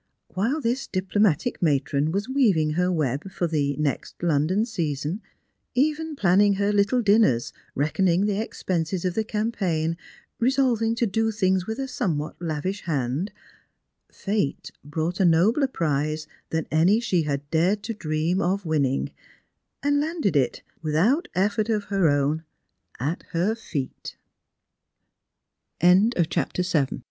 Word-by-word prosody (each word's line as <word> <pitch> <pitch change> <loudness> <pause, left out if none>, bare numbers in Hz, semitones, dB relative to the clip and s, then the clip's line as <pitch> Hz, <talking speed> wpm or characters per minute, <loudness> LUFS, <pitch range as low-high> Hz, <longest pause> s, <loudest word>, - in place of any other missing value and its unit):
YV^hile 250 +11 0
this 245 +4 -1
diplo 185 +1 -3
matic 210 - +2
matron 145 -1 +1
was 200 +3 -1
weaving 210 - +2
her 180 +3 +1
web 150 +1 -1
for 185 -1 -2
the 145 -4 0
next 150 -3 -2
London 170 +6 +2
season 165 - -3 0.3
— - - -51
even 305 +4 +1
planning 200 -2 +4
her 200 +1 +1
little 205 +5 +2
dinners, 205 - +3 0.2
reckoning 175 +6 +2
the 205 0 0
expenses 180 -4 -2
of 180 - 0
the 220 - 0
campaign, 190 -8 -1 0.4
resolving 235 -3 +2
to 235 - +1
do 225 +2 +1
thing* 190 -3 +2
j 180 - -7
with 220 - -3
a 270 0 -3
somewhat 155 - -2
lavish 170 +5 -3
hand 145 - -1 0.4
— - - -45
Fate 200 -8 -1
brought 160 +5 -3
a - - +4
nobler 190 - +4
prize 155 - -1 0.2
than 160 -1 -1
any 175 +8 +4
she 190 -7 +1
had 145 -2 -3
dared 185 +6 +2
to 230 - -3
dream 165 0 -1
of 190 +2 0
winning, 140 -4 0 0.7
and 285 0 +2
landed 305 - -1
it, 135 -3 +1 0.2
without 200 - +2
etFort 210 +3 +1
of 210 -3 -1
185 Hz, 125 wpm, -25 LUFS, 155-220 Hz, 0.7 s, planning